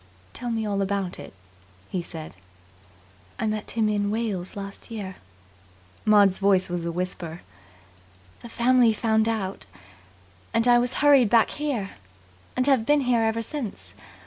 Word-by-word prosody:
"Tell 245 Hz, 0 st, -5 dB
me 225 Hz, -1 st, -1 dB
all 200 Hz, -1 st, -1 dB
about 195 Hz, -2 st, -2 dB
it," -, -, -9 dB, 0.6 s
he 185 Hz, -, -1 dB
said. 160 Hz, -2 st, -9 dB, 1.0 s
"I -, -, -2 dB
met 215 Hz, -1 st, -2 dB
him 225 Hz, -2 st, +1 dB
in 205 Hz, -1 st, 0 dB
Wales 210 Hz, -5 st, -3 dB
last 200 Hz, +2 st, -8 dB
year." 200 Hz, -5 st, -6 dB, 0.9 s
Maud's 205 Hz, -3 st, +5 dB
voice 190 Hz, -2 st, +3 dB
was 175 Hz, -1 st, -2 dB
a 170 Hz, -, -2 dB
whisper. 175 Hz, -1 st, -4 dB, 1.0 s
"The 235 Hz, -, -11 dB
family 240 Hz, 0 st, +4 dB
found 220 Hz, 0 st, +1 dB
out, 195 Hz, -, -3 dB, 0.9 s
and 230 Hz, +1 st, +2 dB
I 240 Hz, 0 st, +6 dB
was 245 Hz, +1 st, +2 dB
hurried 275 Hz, -6 st, +6 dB
back 230 Hz, +1 st, +4 dB
here, 270 Hz, -10 st, -3 dB, 0.7 s
and 255 Hz, -, +2 dB
have 270 Hz, -5 st, +3 dB
been 290 Hz, +5 st, +3 dB
here 245 Hz, -3 st, +2 dB
ever 225 Hz, +1 st, 0 dB
since. 245 Hz, -4 st, -7 dB
215 Hz, 145 wpm, -25 LUFS, 195-235 Hz, 1.0 s, I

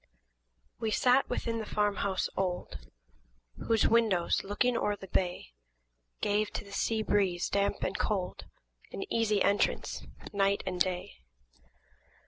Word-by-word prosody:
WE 225 Hz, -1 st, -1 dB
sat 250 Hz, +5 st, +3 dB
within 230 Hz, -2 st, -2 dB
the 220 Hz, -, -4 dB
farm 210 Hz, -1 st, +1 dB
house 195 Hz, -2 st, 0 dB
old, 180 Hz, -, -3 dB, 0.8 s
Whose 225 Hz, -1 st, +4 dB
windows, 220 Hz, -7 st, +2 dB
looking 220 Hz, +5 st, +1 dB
o'er 210 Hz, -3 st, +1 dB
the 195 Hz, -, -10 dB
bay, 175 Hz, -, -2 dB, 0.7 s
Gave 210 Hz, +1 st, +1 dB
to -, -, -3 dB
the 200 Hz, -, -14 dB
sea 220 Hz, +2 st, 0 dB
breeze, 190 Hz, -5 st, +1 dB
damp 200 Hz, 0 st, 0 dB
and -, -, -1 dB
cold, 190 Hz, -4 st, -2 dB, 0.5 s
An 390 Hz, -, -4 dB
easy 215 Hz, -3 st, +2 dB
entrance, 200 Hz, +1 st, +1 dB, 0.3 s
night 200 Hz, 0 st, +2 dB
and 180 Hz, -1 st, -3 dB
day. 180 Hz, -, -1 dB
205 Hz, 130 wpm, -31 LUFS, 185-220 Hz, 0.8 s, Whose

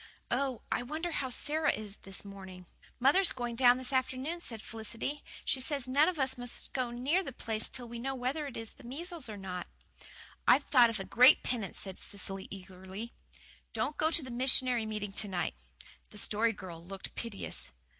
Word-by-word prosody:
Oh, 265 Hz, -4 st, 0 dB
I -, -, +2 dB
wonder 310 Hz, +7 st, -3 dB
how 270 Hz, -4 st, -1 dB
Sara 300 Hz, +4 st, +2 dB
is 210 Hz, -1 st, -5 dB
this 195 Hz, +1 st, -7 dB
morning." 190 Hz, -2 st, -9 dB, 0.3 s
"Mother's 315 Hz, +9 st, +5 dB
going 240 Hz, -2 st, -3 dB
down 245 Hz, 0 st, +7 dB
this 260 Hz, +1 st, -1 dB
afternoon," 260 Hz, +6 st, 0 dB
said 230 Hz, -9 st, 0 dB
Felicity. 225 Hz, +6 st, -4 dB, 0.2 s
"She 265 Hz, -, +2 dB
says 275 Hz, -1 st, -1 dB
none 285 Hz, +6 st, +5 dB
of 360 Hz, -, -3 dB
us 265 Hz, -2 st, +1 dB
must 245 Hz, 0 st, -3 dB
go 255 Hz, -2 st, 0 dB
near 260 Hz, +10 st, +1 dB
the 270 Hz, -, -5 dB
place 225 Hz, -2 st, 0 dB
till 245 Hz, -2 st, -5 dB
we 235 Hz, 0 st, -6 dB
know 270 Hz, +3 st, -2 dB
whether 265 Hz, +4 st, -1 dB
it 270 Hz, -, -7 dB
is 225 Hz, -1 st, -5 dB
the -, -, -17 dB
measles 310 Hz, +2 st, -5 dB
or 210 Hz, -, -5 dB
not." 185 Hz, -2 st, -5 dB, 0.8 s
"I've 285 Hz, -, +7 dB
thought 245 Hz, -5 st, +6 dB
of 225 Hz, -2 st, -2 dB
a -, -, -2 dB
great 250 Hz, +5 st, +7 dB
penance," 225 Hz, -6 st, -2 dB
said 190 Hz, -2 st, -6 dB
Cecily 195 Hz, -1 st, -2 dB
eagerly. 190 Hz, +3 st, -8 dB, 0.6 s
"Don't 300 Hz, -, 0 dB
go 315 Hz, -, +4 dB
to 330 Hz, -2 st, +3 dB
the 260 Hz, -, -7 dB
missionary 250 Hz, -2 st, +3 dB
meeting 210 Hz, -2 st, -3 dB
to 205 Hz, +1 st, +1 dB
night." 185 Hz, -3 st, -1 dB, 0.6 s
The 210 Hz, -, -12 dB
Story 215 Hz, +2 st, +2 dB
Girl 180 Hz, -6 st, -8 dB
looked 190 Hz, +2 st, -7 dB
piteous. 195 Hz, -, -4 dB
240 Hz, 190 wpm, -33 LUFS, 205-270 Hz, 0.8 s, down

